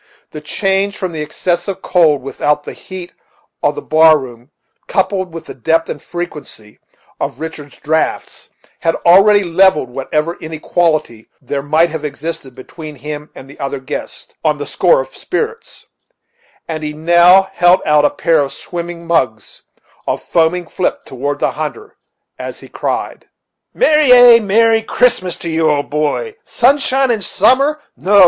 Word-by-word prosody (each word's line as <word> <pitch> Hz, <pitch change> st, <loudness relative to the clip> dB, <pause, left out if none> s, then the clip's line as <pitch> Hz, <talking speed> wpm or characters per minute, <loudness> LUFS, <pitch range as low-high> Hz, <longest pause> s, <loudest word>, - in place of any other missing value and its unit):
The 150 Hz, -, -8 dB
change 195 Hz, +5 st, -1 dB
from 185 Hz, -3 st, -3 dB
the 160 Hz, -2 st, -5 dB
excessive 175 Hz, +5 st, -2 dB
cold 155 Hz, -7 st, +3 dB
without 145 Hz, +2 st, -1 dB
to -, -, -7 dB
the -, -, -11 dB
heat 185 Hz, -2 st, -9 dB, 0.5 s
of -, -, +1 dB
the 440 Hz, -, -6 dB
bar 160 Hz, 0 st, +5 dB
room, 125 Hz, -2 st, -10 dB, 0.4 s
coupled 190 Hz, -1 st, -1 dB
with 165 Hz, 0 st, -8 dB
the -, -, -9 dB
depth 165 Hz, +6 st, 0 dB
and -, -, -5 dB
frequency 150 Hz, -11 st, -8 dB, 0.4 s
of 125 Hz, -, -4 dB
Richard's 155 Hz, -3 st, -8 dB
draughts, 160 Hz, +2 st, -2 dB, 0.3 s
had 165 Hz, -, 0 dB
already 195 Hz, +4 st, +6 dB
levelled 170 Hz, -7 st, +2 dB
whatever 150 Hz, +6 st, -2 dB
inequality 160 Hz, -6 st, -1 dB
there 140 Hz, +2 st, -4 dB
might 155 Hz, +4 st, +2 dB
have 160 Hz, -1 st, -5 dB
existed 150 Hz, -3 st, -6 dB
between 155 Hz, +3 st, -10 dB
him 150 Hz, +2 st, -7 dB
and 135 Hz, -, -11 dB
the 140 Hz, -, -15 dB
other 140 Hz, 0 st, -3 dB
guests, 130 Hz, +3 st, -7 dB
on 155 Hz, -2 st, +1 dB
the 145 Hz, -, -5 dB
score 175 Hz, -7 st, +2 dB
of 135 Hz, 0 st, -11 dB
spirits; 455 Hz, +4 st, -5 dB, 0.8 s
and 160 Hz, -1 st, -4 dB
he 150 Hz, -1 st, -4 dB
now 175 Hz, +4 st, +5 dB
held 175 Hz, +1 st, +4 dB
out 150 Hz, -1 st, +4 dB
a 145 Hz, -, +4 dB
pair 165 Hz, -1 st, +1 dB
of 140 Hz, -1 st, -1 dB
swimming 170 Hz, +1 st, -7 dB
mugs 125 Hz, -11 st, -1 dB, 0.5 s
of -, -, -2 dB
foaming 170 Hz, +2 st, +1 dB
flip 180 Hz, -, -3 dB
toward 140 Hz, +3 st, -4 dB
the -, -, 0 dB
hunter, 155 Hz, -, -6 dB, 0.4 s
as -, -, -7 dB
he -, -, -12 dB
cried: -, -, -4 dB, 0.4 s
"Merry! 305 Hz, -, +3 dB
ay! 245 Hz, -1 st, +8 dB
merry 225 Hz, +2 st, +3 dB
Christmas 220 Hz, -6 st, +1 dB
to -, -, -8 dB
you, 160 Hz, -1 st, +2 dB
old 145 Hz, -1 st, -1 dB
boy! 155 Hz, -, -1 dB
Sun 270 Hz, -1 st, +2 dB
shine 270 Hz, -1 st, +1 dB
and 220 Hz, -4 st, -1 dB
summer! 275 Hz, +11 st, +2 dB, 0.2 s
no! 200 Hz, +2 st, +3 dB
165 Hz, 160 wpm, -15 LUFS, 150-190 Hz, 0.8 s, ay